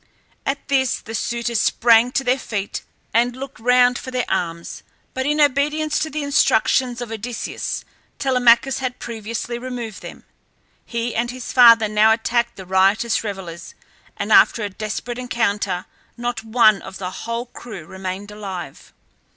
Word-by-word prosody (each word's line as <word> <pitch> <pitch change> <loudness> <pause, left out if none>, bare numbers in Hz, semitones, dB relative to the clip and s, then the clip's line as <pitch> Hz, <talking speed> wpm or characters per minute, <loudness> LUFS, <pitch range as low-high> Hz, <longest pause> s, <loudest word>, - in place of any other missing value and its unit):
At 275 +1 -2
this 265 -3 +1
the 225 - -9
suitors 235 0 -1
sprang 235 +2 +4
to 270 - +1
their 255 +1 +1
feet 205 -5 -4 0.3
and 240 +2 +2
looked 270 -2 -8
round 250 +1 +4
for - - -8
their 255 -1 -1
arms; 170 -3 -3 0.3
but 260 +1 -2
in 300 +1 +1
obedience 295 +2 +2
to 315 - -2
the 305 +1 -3
instructions 250 -2 +2
of 240 -2 -6
Odysseus 225 +2 -4 0.3
Telemachus 250 -1 +3
had 255 -1 -3
previously 230 +1 -5
removed 240 -4 -6
them. - - -10 0.6
He 235 0 -2
and 235 +1 -1
his 250 0 -6
father 230 -3 +7
now 215 +1 +4
attacked 235 +1 0
the 190 - -10
riotous 195 +6 +2
revellers, 190 -5 -7 0.4
and - - -3
after 225 - +5
a 205 - -2
desperate 220 +5 -5
encounter 205 -6 -1 0.3
not 240 -1 -3
one 220 -2 +4
of 190 - -9
the 185 -1 -5
whole 230 +4 -4
crew 220 -8 -10
remained 190 +3 -6
alive. 195 -4 -8
235 Hz, 150 wpm, -21 LUFS, 210-250 Hz, 0.6 s, father